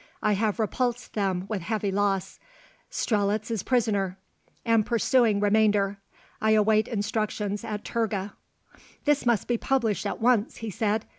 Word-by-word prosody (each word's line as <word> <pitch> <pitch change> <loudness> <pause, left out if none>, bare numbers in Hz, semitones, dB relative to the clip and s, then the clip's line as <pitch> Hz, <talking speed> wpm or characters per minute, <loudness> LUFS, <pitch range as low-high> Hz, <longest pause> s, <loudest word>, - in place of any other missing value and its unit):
I 210 - +3
have 210 +1 0
repulsed 240 +2 -1
them 190 -3 -1
with 210 -3 -3
heavy 210 +2 -2
loss. 195 -1 -1 0.5
Strelitz 210 0 0
is 220 -4 -1
prisoner. 205 -7 0 0.5
Am 230 -2 +4
pursuing 230 0 +2
remainder. 205 -1 +2 0.4
I 220 0 +3
await 215 0 +3
instructions 210 -1 -2
at 210 -2 -5
Turga_. 210 -4 -2 0.7
"This 290 -4 +2
must 235 -3 +2
be 240 -1 0
published 235 -7 0
at - - -4
once," 235 -2 +2
he 225 -1 -5
said. 215 +1 -1
215 Hz, 140 wpm, -26 LUFS, 205-230 Hz, 0.7 s, Am